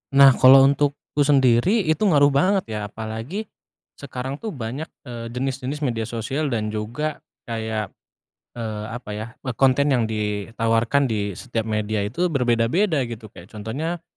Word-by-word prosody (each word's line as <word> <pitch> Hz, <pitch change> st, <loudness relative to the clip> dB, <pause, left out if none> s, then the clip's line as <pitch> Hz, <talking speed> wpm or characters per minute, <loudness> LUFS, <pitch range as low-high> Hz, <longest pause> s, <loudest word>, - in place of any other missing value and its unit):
Nah, 140 Hz, 0 st, +9 dB
kalau 135 Hz, +1 st, +9 dB
untukku 140 Hz, +1 st, 0 dB
sendiri 140 Hz, -, +4 dB
itu 155 Hz, -2 st, +1 dB
ngaruh 145 Hz, -5 st, +5 dB
banget 185 Hz, +8 st, +2 dB
ya, 105 Hz, -, -2 dB
apalagi 110 Hz, -, -5 dB, 0.6 s
sekarang 130 Hz, +1 st, -5 dB
tuh 220 Hz, -6 st, -5 dB
banyak, 130 Hz, +6 st, -5 dB, 0.2 s
eee, 120 Hz, -4 st, -7 dB
jenis-jenis 135 Hz, +4 st, -3 dB
media 115 Hz, -5 st, -1 dB
sosial 120 Hz, +7 st, -2 dB
dan 110 Hz, -5 st, -2 dB
juga 120 Hz, +9 st, -3 dB, 0.2 s
kayak, 110 Hz, -3 st, -3 dB, 0.7 s
eee, 110 Hz, -2 st, -4 dB
apa 120 Hz, -1 st, -7 dB
ya, 105 Hz, +2 st, -5 dB, 0.2 s
eee, 130 Hz, -, -2 dB
konten 135 Hz, +3 st, +3 dB
yang 115 Hz, -3 st, +1 dB
ditawarkan 115 Hz, +5 st, 0 dB
di 105 Hz, -5 st, -2 dB
setiap 115 Hz, -3 st, -3 dB
media 105 Hz, 0 st, -1 dB
itu 160 Hz, -, -1 dB
berbeda-beda 130 Hz, -, +2 dB
gitu. 115 Hz, -2 st, -8 dB
Kayak 90 Hz, +1 st, -15 dB
contohnya 140 Hz, +11 st, -4 dB
125 Hz, 145 wpm, -23 LUFS, 110-140 Hz, 0.7 s, Nah